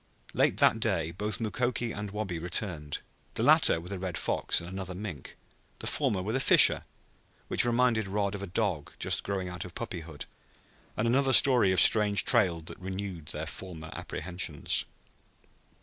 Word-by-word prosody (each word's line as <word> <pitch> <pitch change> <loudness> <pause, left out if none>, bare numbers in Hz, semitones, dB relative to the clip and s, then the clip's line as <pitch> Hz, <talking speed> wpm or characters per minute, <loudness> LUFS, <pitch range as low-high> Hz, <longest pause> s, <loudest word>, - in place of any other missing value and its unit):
Late - - +2
that - - +4
day 80 0 -1
both 105 +5 -3
Mukoki 120 +1 -2
and 105 0 -5
Wabi 95 -4 -4
returned, 85 -4 -2 0.3
the - - -1
latter - - +5
with 90 +3 -6
a 100 - -4
red 90 -3 -4
fox - - 0
and 85 - -8
another 95 0 -6
mink, 90 -8 -7 0.4
the - - -9
former 95 -3 0
with 110 +5 -2
a - - +1
fisher, - - +6 0.6
which - - +2
reminded 120 -3 +2
Rod 100 0 -1
of 100 - -5
a 100 - -5
dog 95 -6 -2
just - - 0
growing 95 -2 -3
out 90 0 -6
of 90 -2 -11
puppyhood, 85 -9 -7 0.7
and 110 - 0
another 130 +2 +2
story 125 -8 +6
of 95 - +2
strange 105 -2 +4
trails 85 -5 +2
that - - -8
renewed 95 -4 -6
their 75 +1 -2
former 80 -1 -8
apprehensions. 85 -4 -3
95 Hz, 165 wpm, -29 LUFS, 85-105 Hz, 0.7 s, fisher